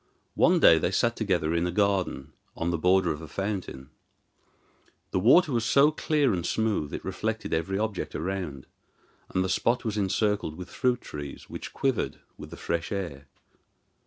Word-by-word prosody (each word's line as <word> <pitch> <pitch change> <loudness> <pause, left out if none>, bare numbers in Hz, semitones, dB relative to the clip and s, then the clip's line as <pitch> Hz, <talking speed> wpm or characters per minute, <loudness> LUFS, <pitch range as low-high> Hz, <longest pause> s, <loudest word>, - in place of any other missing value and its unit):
One - - +4
day 80 - +7
they 85 - +1
sat 115 +5 +1
together 90 -7 0
in 85 +1 +1
a - - -2
garden 95 -8 0 0.2
on 85 +1 -1
the 85 - 0
border 90 0 +3
of 75 0 -5
a 80 - -8
fountain. 95 -9 -4 1.2
The - - +1
water 145 - +5
was 120 -3 +1
so 140 +7 +5
clear 150 -5 +1
and 85 -2 -2
smooth 105 -7 0
it - - -6
reflected 110 +4 -3
every 80 +4 -1
object 105 -2 -3
around, 85 -7 -4 0.6
and 95 - 0
the - - -1
spot 120 +6 +1
was 110 -1 -1
encircled 105 -3 0
with 90 +2 -9
fruit 125 -2 0
trees 70 -1 -8
which - - -7
quivered 135 -4 -1 0.2
with - - -10
the - - -10
fresh 85 -1 -3
air. 85 -9 -4
95 Hz, 170 wpm, -27 LUFS, 85-110 Hz, 1.2 s, day